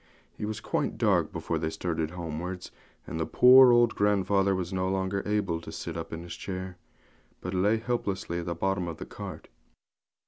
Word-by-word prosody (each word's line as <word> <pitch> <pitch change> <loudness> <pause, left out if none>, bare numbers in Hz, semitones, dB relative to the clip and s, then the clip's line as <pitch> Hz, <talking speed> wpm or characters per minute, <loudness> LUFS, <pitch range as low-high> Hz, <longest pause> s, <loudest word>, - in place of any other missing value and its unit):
It 105 - -2
was 105 -1 -4
quite - - -1
dark - - +2
before 80 - -2
they 80 0 -1
started 80 -2 -2
homewards, 90 +1 -5 0.3
and 80 - -5
the 80 - 0
poor 125 0 +8
old 120 -1 +5
grandfather 100 -1 +2
was 90 0 -3
no 95 0 0
longer 95 +1 -1
able 100 -6 0
to - - -9
sit - - -6
up 80 0 -5
in 80 +1 -5
his 85 -1 -7
chair, 95 -2 -6 0.6
but 90 - -5
lay 100 +4 +3
helplessly 100 -7 -2
at 85 - -6
the 85 - -2
bottom 95 +1 -1
of 85 - -5
the - - -7
cart. - - -8
95 Hz, 185 wpm, -28 LUFS, 85-100 Hz, 0.6 s, poor